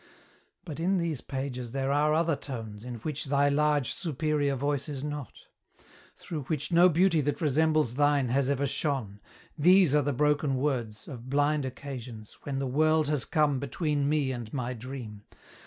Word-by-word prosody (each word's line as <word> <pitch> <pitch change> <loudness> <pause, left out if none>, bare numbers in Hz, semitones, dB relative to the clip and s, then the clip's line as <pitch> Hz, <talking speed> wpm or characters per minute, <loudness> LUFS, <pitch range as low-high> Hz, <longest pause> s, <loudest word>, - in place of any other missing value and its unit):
But 155 -3 -7
in 185 +4 +1
these 165 -6 -2
pages 130 -3 -5
there 135 0 -1
are 150 +2 +3
other 165 -1 +2
tones 115 -7 -7
In 125 0 -6
which 155 +2 -3
thy 140 +1 +2
large, 145 -2 +2
superior 150 -3 -1
voice 145 +2 -2
is 140 -2 -5
not 145 -4 -5 0.9
Through 150 -5 -6
which 150 +2 -3
no 175 +2 +6
beauty 170 -1 +3
that 145 +1 -1
resembles 155 -4 +2
thine 145 -1 +2
Has 135 +2 +1
ever 140 0 +1
shone. 130 -8 -2 0.4
These 175 0 +5
are 150 - +5
the 145 +1 0
broken 145 +1 +1
words 125 -6 -2
Of 130 -3 -9
blind 145 0 +1
occasions, 125 -5 -8
when 140 -2 -4
the 135 - -1
World 155 +3 +2
has 145 -6 0
come 150 -4 +2
Between 145 +1 -1
me 150 -3 +1
and 120 -4 -6
my 125 -2 -3
Dream. 120 -3 -8
145 Hz, 170 wpm, -28 LUFS, 130-150 Hz, 0.9 s, no